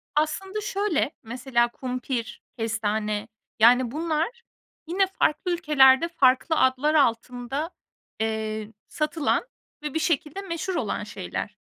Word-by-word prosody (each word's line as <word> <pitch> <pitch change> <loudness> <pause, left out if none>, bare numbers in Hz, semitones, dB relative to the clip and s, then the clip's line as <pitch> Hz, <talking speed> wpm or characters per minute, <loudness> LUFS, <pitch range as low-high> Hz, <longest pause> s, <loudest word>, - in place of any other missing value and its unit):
Aslında 380 +7 -1
şöyle; 395 -8 0
mesela 240 +1 +1
kumpir, 250 -2 -4 0.2
kestane, 215 -2 -1 0.3
yani, 245 +2 +6
bunlar 325 - -1 0.5
yine 380 +3 +2
farklı 360 -1 0
ülkelerde, 300 -3 +5
farklı 285 0 +3
adlar 260 +4 +3
altında, 250 +4 0 0.5
eee, 220 0 -2
satılan 305 +7 0 0.4
ve 300 - -4
bir 320 - 0
şekilde 315 +2 -1
meşhur 370 0 -3
olan - - -2
şeyler. - - -5
280 Hz, 110 wpm, -25 LUFS, 235-330 Hz, 0.5 s, yani